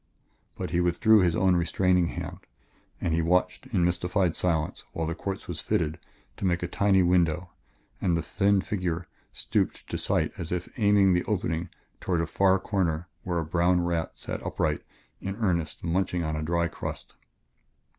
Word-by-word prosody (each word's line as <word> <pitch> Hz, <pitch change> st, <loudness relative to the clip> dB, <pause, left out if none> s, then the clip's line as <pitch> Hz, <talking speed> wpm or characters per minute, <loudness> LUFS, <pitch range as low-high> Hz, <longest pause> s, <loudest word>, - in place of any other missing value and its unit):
But -, -, -4 dB
he 85 Hz, 0 st, +2 dB
withdrew 95 Hz, +5 st, +5 dB
his 90 Hz, -3 st, +3 dB
own 95 Hz, -1 st, +3 dB
restraining 90 Hz, +1 st, +2 dB
hand, -, -, -6 dB, 0.6 s
and 85 Hz, -, -1 dB
he 85 Hz, -, +2 dB
watched 90 Hz, +3 st, +1 dB
in 85 Hz, -, +1 dB
mystified 90 Hz, 0 st, +1 dB
silence 80 Hz, -3 st, -1 dB
while 80 Hz, -, -2 dB
the 85 Hz, -, -2 dB
quartz 95 Hz, +3 st, -5 dB
was 85 Hz, -3 st, -3 dB
fitted 80 Hz, +1 st, 0 dB, 0.4 s
to -, -, -3 dB
make 90 Hz, -1 st, +1 dB
a -, -, 0 dB
tiny 95 Hz, +1 st, +3 dB
window 90 Hz, 0 st, +2 dB, 0.5 s
and 85 Hz, -2 st, +2 dB
the 85 Hz, -, -2 dB
thin 100 Hz, 0 st, +2 dB
figure 90 Hz, -4 st, -2 dB, 0.2 s
stooped -, -, -1 dB
to -, -, -2 dB
sight -, -, +1 dB
as 85 Hz, -2 st, -5 dB
if 90 Hz, -1 st, -2 dB
aiming 100 Hz, -4 st, +5 dB
the 90 Hz, -, +2 dB
opening 85 Hz, -5 st, -1 dB, 0.3 s
toward 90 Hz, -3 st, 0 dB
a 85 Hz, -, +1 dB
far 95 Hz, +3 st, +3 dB
corner 90 Hz, -4 st, -1 dB
where 90 Hz, -2 st, -2 dB
a 80 Hz, -, -1 dB
brown 90 Hz, +2 st, +2 dB
rat 85 Hz, -2 st, -2 dB
sat -, -, -5 dB
upright -, -, -1 dB, 0.4 s
in 95 Hz, 0 st, -4 dB
earnest 85 Hz, -8 st, -1 dB
munching 90 Hz, 0 st, 0 dB
of 80 Hz, -1 st, -2 dB
a 75 Hz, -, -2 dB
dry 85 Hz, +2 st, +1 dB
crust. 85 Hz, -, -7 dB
90 Hz, 175 wpm, -27 LUFS, 85-95 Hz, 0.6 s, withdrew